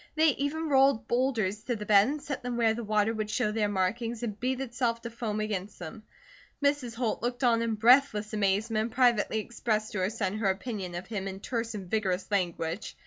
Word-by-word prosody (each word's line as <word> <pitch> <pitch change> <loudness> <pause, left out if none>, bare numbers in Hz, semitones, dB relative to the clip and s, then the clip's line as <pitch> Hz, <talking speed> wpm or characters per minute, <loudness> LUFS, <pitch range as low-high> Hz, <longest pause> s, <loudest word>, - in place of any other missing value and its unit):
They 315 0 +5
even 295 +3 -1
rolled 270 -4 +3
boulders 230 -5 0
to 245 - -1
the 210 -1 -6
bed 205 0 +6
and 295 +3 -2
set 280 -2 -5
them 245 -1 -3
where 225 -2 +3
the 235 +1 -5
water 215 +1 +1
would 215 -1 -3
show 210 0 0
their 210 -1 0
markings 225 +5 -1
and 215 -3 -4
beat 255 +1 -1
itself 240 -3 -2
to 235 - -5
foam 225 -2 -3
against 210 -2 -3
them. 175 +6 -8 0.6
Mrs. 280 -5 0
Holt 235 -2 -1
looked 245 +2 -2
on 230 -2 +4
in 230 -1 0
breathless 225 -2 +4
amazement 210 +2 +1
and 225 +2 -3
privately 240 -4 +3
expressed 215 -1 -2
to 210 - -3
her 185 +1 +1
son 210 -2 -2
her 205 -3 +2
opinion 190 -2 -3
of 175 +2 -5
him 195 -2 -4
in 190 0 -6
terse 230 +1 -3
and 195 -3 -6
vigorous 190 -1 -1
language. 175 -1 -2
220 Hz, 210 wpm, -29 LUFS, 205-245 Hz, 0.6 s, bed